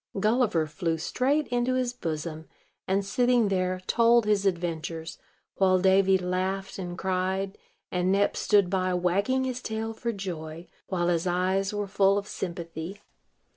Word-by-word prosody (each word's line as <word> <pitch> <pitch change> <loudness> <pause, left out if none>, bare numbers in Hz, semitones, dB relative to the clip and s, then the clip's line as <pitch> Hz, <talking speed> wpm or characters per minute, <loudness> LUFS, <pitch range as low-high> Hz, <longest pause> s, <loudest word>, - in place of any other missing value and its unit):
Gulliver 215 -6 +2
flew 165 +2 -2
straight 270 - 0
into 245 +1 +1
his 250 -1 0
bosom, 160 -6 -5 0.4
and, 195 +1 +1
sitting 245 +1 +2
there, 185 -1 0
told 235 +1 +4
his 205 -2 +2
adventures; 165 -2 -3 0.4
while 185 -1 +4
Davy 190 +1 +4
laughed 185 +2 -2
and 175 -1 -5
cried, 190 +1 -1 0.4
and 180 +1 +1
Nep 200 +1 +2
stood 205 -3 +3
by, 185 0 0
wagging 200 +9 +1
his 255 -1 -3
tail 220 0 -3
for 235 +1 -3
joy, 170 -5 -6 0.2
while 175 -2 0
his 170 0 +1
eyes 185 +2 +1
were 205 -1 -2
full 195 0 +3
of 205 0 -3
sympathy. 170 +1 -6
190 Hz, 145 wpm, -27 LUFS, 175-210 Hz, 0.4 s, told